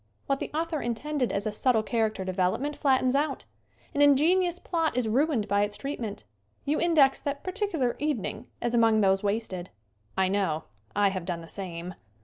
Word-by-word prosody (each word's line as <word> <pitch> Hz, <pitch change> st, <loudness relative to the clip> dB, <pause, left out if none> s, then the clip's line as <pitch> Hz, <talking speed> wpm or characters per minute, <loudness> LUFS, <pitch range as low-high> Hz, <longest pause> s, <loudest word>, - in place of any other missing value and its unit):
What 275 Hz, 0 st, 0 dB
the -, -, -4 dB
author 320 Hz, 0 st, -2 dB
intended 250 Hz, +3 st, -1 dB
as 200 Hz, +2 st, -2 dB
a 215 Hz, -, 0 dB
subtle 220 Hz, +1 st, +2 dB
character 220 Hz, -4 st, -1 dB
development 185 Hz, +10 st, 0 dB
flattens 260 Hz, -3 st, +2 dB
out. 290 Hz, +2 st, 0 dB, 0.5 s
An 285 Hz, -, +1 dB
inge 285 Hz, -2 st, +6 dB
nious 355 Hz, +2 st, +3 dB
plot 325 Hz, -6 st, 0 dB
is 245 Hz, -3 st, +1 dB
ruined 250 Hz, -1 st, +1 dB
by 200 Hz, 0 st, +2 dB
its 205 Hz, 0 st, -1 dB
treatment. 235 Hz, -, -5 dB, 0.4 s
You 295 Hz, +2 st, +1 dB
in 340 Hz, -1 st, +2 dB
dex 275 Hz, -3 st, +5 dB
that 280 Hz, 0 st, -3 dB
particular 370 Hz, -, -1 dB
evening 255 Hz, -5 st, -2 dB, 0.2 s
as 240 Hz, 0 st, 0 dB
among 225 Hz, -2 st, +4 dB
those 195 Hz, -1 st, +3 dB
wasted. 200 Hz, -4 st, -2 dB, 0.5 s
I 190 Hz, 0 st, +3 dB
know. 185 Hz, -5 st, 0 dB, 0.3 s
I 205 Hz, 0 st, +4 dB
have 190 Hz, -2 st, -4 dB
done 175 Hz, -2 st, -3 dB
the 165 Hz, -, -11 dB
same. 180 Hz, -2 st, -6 dB
235 Hz, 180 wpm, -28 LUFS, 200-290 Hz, 0.5 s, inge